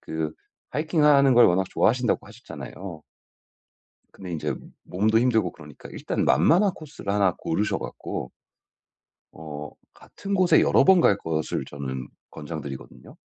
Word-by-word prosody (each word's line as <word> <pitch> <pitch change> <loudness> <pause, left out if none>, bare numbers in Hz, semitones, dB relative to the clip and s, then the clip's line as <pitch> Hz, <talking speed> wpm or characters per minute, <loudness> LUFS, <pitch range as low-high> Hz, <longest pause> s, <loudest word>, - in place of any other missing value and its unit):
그 80 -1 -4 0.4
하이킹하는 150 -3 +3
걸 120 - +7
워낙 95 +2 +2
좋아하신다고 125 -1 +1
하셨잖아요. 90 - -10 1.1
근데 90 -2 -9
인제 75 -4 -3 0.3
몸도 110 +4 +1
힘들고 110 -7 +2
그러니까 75 -3 -13
일단 - - -2
만만한 175 - +4
코스를 150 - -7
하나 100 -3 +2
고르셔 100 +6 -1
갖고 60 - -6 1.0
어 75 -2 -8 0.2
같은 200 0 -8
곳에 185 -2 +4
여러 - - +4
번 190 -2 +6
갈 100 - +4
것을 80 -4 -3
저는 65 -3 -6 0.2
권장 80 0 -7
드리거든요. 70 -2 -10
95 Hz, 305 characters per minute, -25 LUFS, 75-125 Hz, 1.1 s, 걸